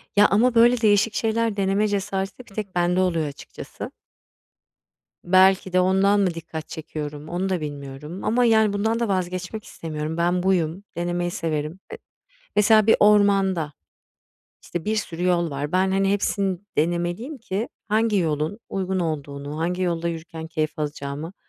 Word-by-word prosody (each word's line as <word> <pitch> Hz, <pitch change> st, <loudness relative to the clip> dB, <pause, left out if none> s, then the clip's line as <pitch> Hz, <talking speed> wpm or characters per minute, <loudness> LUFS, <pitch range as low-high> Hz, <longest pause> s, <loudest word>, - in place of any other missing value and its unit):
Ya, 205 Hz, 0 st, +7 dB
ama 235 Hz, +5 st, +3 dB
böyle 235 Hz, +1 st, +5 dB
değişik 210 Hz, 0 st, +3 dB
şeyler 225 Hz, -1 st, 0 dB
deneme 195 Hz, +2 st, +2 dB
cesareti 195 Hz, 0 st, -2 dB
bir 235 Hz, -5 st, -13 dB
tek 200 Hz, -4 st, -5 dB
bende 175 Hz, +1 st, +2 dB
oluyor 170 Hz, -4 st, +1 dB
açıkçası. 140 Hz, -, -9 dB, 1.3 s
Belki 190 Hz, +1 st, +4 dB
de 185 Hz, -, +4 dB
ondan 190 Hz, +2 st, +3 dB
mı 190 Hz, -3 st, +2 dB
dikkat 165 Hz, -1 st, -7 dB
çekiyorum? 150 Hz, -1 st, -6 dB
Onu 180 Hz, +2 st, -2 dB
da 185 Hz, -3 st, -1 dB
bilmiyorum 145 Hz, +3 st, -7 dB
ama 245 Hz, +3 st, +2 dB
yani 220 Hz, -3 st, +4 dB
bundan 220 Hz, +3 st, 0 dB
da 235 Hz, -, 0 dB
vazgeçmek 185 Hz, +2 st, -2 dB
istemiyorum. 155 Hz, 0 st, -5 dB
Ben 175 Hz, +1 st, +1 dB
buyum, 180 Hz, -1 st, +1 dB
denemeyi 175 Hz, 0 st, -1 dB
severim. 155 Hz, +1 st, -3 dB
Eee, -, -, -6 dB, 0.6 s
mesela 215 Hz, 0 st, +5 dB
bir 225 Hz, -, +6 dB
ormanda, 195 Hz, -6 st, +4 dB, 0.9 s
işte, 175 Hz, -2 st, -5 dB
bir 215 Hz, -, 0 dB
sürü 175 Hz, -5 st, -3 dB
yol 175 Hz, -2 st, +2 dB
var. 145 Hz, +2 st, -3 dB
Ben, 190 Hz, +1 st, +2 dB
hani, 195 Hz, 0 st, +2 dB
hepsini 200 Hz, -2 st, 0 dB, 0.2 s
denemeliyim 175 Hz, -, -1 dB
ki 220 Hz, -1 st, -3 dB, 0.2 s
hangi 215 Hz, 0 st, +2 dB
yolun 160 Hz, +3 st, -1 dB
uygun 190 Hz, -1 st, -1 dB
olduğunu, 145 Hz, -2 st, -4 dB
hangi 180 Hz, +3 st, -1 dB
yolda 170 Hz, -2 st, 0 dB
yürürken 160 Hz, -1 st, -6 dB
keyif 155 Hz, -2 st, -2 dB
alacağımı 145 Hz, +2 st, -4 dB
185 Hz, 150 wpm, -23 LUFS, 160-205 Hz, 1.3 s, Ya